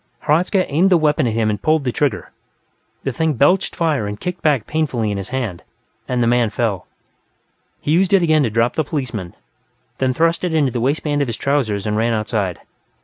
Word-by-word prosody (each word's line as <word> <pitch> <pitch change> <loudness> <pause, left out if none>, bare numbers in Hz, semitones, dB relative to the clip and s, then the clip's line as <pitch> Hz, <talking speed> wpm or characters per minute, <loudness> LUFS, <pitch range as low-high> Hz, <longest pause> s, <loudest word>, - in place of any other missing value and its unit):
Hradzka 180 +5 +2
aimed 170 +7 +2
the 180 - +5
weapon 150 -3 +2
at 115 - -1
him 110 -1 +1
and 105 -1 -4
pulled 155 -1 +2
the 125 - -1
trigger; 145 +2 -1 0.7
the 135 - -2
thing 160 +1 0
belched 175 +9 +2
fire 155 - 0
and 105 0 -6
kicked 180 0 -5
back 140 -8 +2
painfully 130 -9 -1
in 100 - -2
his 95 -1 -5
hand, 115 -10 -3 0.5
and 125 -1 0
the - - +2
man 120 -1 +3
fell. 105 -5 -2 0.9
He 150 - -2
used 180 +4 +3
it 195 -3 +4
again 155 -2 +3
to 125 - +1
drop 115 +2 +1
the 155 - 0
policeman, 120 - -4 0.6
then 130 -1 +2
thrust 165 +6 +1
it 175 -3 -1
into 145 -5 +2
the 120 - -2
waistband 145 +2 0
of 140 - 0
his 115 - -4
trousers 120 -8 0
and 105 0 -1
ran 115 +1 +1
outside. 105 -4 -1
130 Hz, 205 wpm, -19 LUFS, 110-155 Hz, 0.9 s, the